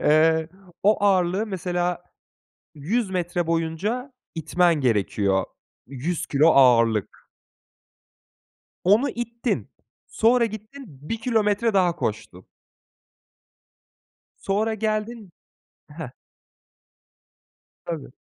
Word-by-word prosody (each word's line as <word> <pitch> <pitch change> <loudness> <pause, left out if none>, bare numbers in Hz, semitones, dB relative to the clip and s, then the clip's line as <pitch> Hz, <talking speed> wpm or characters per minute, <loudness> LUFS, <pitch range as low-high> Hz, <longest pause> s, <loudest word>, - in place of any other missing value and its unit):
Eee, 160 +1 +3 0.3
o 205 0 +3
ağırlığı 190 +1 +2
mesela 180 -2 -2 0.7
100 195 +9 -1
metre 175 -2 -2
boyunca 170 - -2 0.2
itmen 170 +2 +2
gerekiyor. 100 -4 +1 0.4
100 140 +6 -3
kilo 150 +3 +3
ağırlık. 115 -7 +3 1.6
Onu 210 +9 +4
ittin, 235 +1 -3 0.4
sonra 235 +2 +3
gittin, 220 +5 -8 0.2
bir 230 - -1
kilometre 220 -1 +1
daha 180 -3 +3
koştun. 95 -4 -5 2.0
Sonra 215 +3 0
geldin. 215 -1 -3 0.6
Heh. 150 -5 -7 1.7
Tabii. 155 -7 -6
180 Hz, 80 wpm, -24 LUFS, 155-220 Hz, 2.0 s, Onu